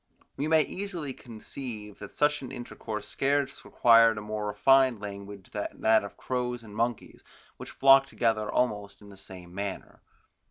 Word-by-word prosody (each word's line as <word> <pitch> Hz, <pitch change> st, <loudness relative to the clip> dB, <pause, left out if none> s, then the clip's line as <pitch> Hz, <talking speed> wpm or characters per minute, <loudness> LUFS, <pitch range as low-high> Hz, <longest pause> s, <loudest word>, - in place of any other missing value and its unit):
We 145 Hz, +3 st, -2 dB
may 160 Hz, -1 st, +5 dB
easily 180 Hz, -8 st, -5 dB
conceive 110 Hz, -3 st, -8 dB
that -, -, -9 dB
such 150 Hz, 0 st, +1 dB
an 130 Hz, -, -8 dB
intercourse 115 Hz, -3 st, -6 dB
scarce 140 Hz, 0 st, -1 dB
required 115 Hz, -2 st, +5 dB
a -, -, -4 dB
more 105 Hz, 0 st, -4 dB
refined 130 Hz, +2 st, +4 dB
language 100 Hz, -1 st, -9 dB
than 105 Hz, -, -5 dB
that 110 Hz, -1 st, +4 dB
of 100 Hz, -, -9 dB
crows 125 Hz, -1 st, -3 dB
and 105 Hz, -2 st, -12 dB
monkeys, 115 Hz, 0 st, -3 dB, 0.3 s
which -, -, -9 dB
flock 135 Hz, 0 st, +6 dB
together 110 Hz, -2 st, 0 dB
almost 105 Hz, -5 st, -1 dB
in 100 Hz, -, -13 dB
the 100 Hz, -, -13 dB
same 95 Hz, -3 st, -12 dB
manner. 100 Hz, 0 st, -6 dB
115 Hz, 160 wpm, -28 LUFS, 105-135 Hz, 0.3 s, flock